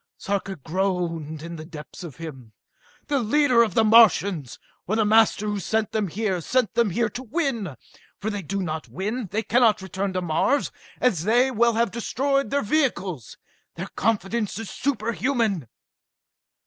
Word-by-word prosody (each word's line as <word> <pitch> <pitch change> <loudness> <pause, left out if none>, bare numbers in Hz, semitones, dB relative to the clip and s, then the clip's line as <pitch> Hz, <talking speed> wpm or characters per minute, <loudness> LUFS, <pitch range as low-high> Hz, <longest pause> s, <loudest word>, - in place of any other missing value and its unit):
Sarka 195 -1 -2
groaned 165 -2 -2
to 165 - -7
the 165 -2 -7
depths 160 +2 -10
of 165 -6 -8
him. 135 -9 -9 0.5
"The 285 -1 +1
leader 255 +1 +4
of 220 -6 +1
the 225 - +5
Martians, 200 - +4 0.3
or 210 - 0
the 220 -1 +2
master 220 0 +4
who 205 -1 -1
sent 220 +3 -1
them 215 -2 0
here, 190 0 -2
sent 245 +2 +1
them 235 -2 +2
here 230 +6 +1
to 245 - -6
win. 245 - -2 0.4
For 210 - -2
if - - -4
they 205 - -3
do 195 +3 -3
not 155 -2 -4
win, 210 +5 -3
they 220 +5 -2
cannot 230 -3 +3
return 190 +1 -3
to 185 - -1
Mars, 175 - +1 0.3
as 200 -11 +2
they 245 +6 +3
will 235 0 +3
have 230 -2 +1
destroyed 275 +4 0
their 280 +1 0
vehicles! 200 - -1 0.4
Their - - -6
confidence 215 -1 -1
is 225 -2 -6
superhuman!" 230 - -1
210 Hz, 165 wpm, -24 LUFS, 180-235 Hz, 0.5 s, the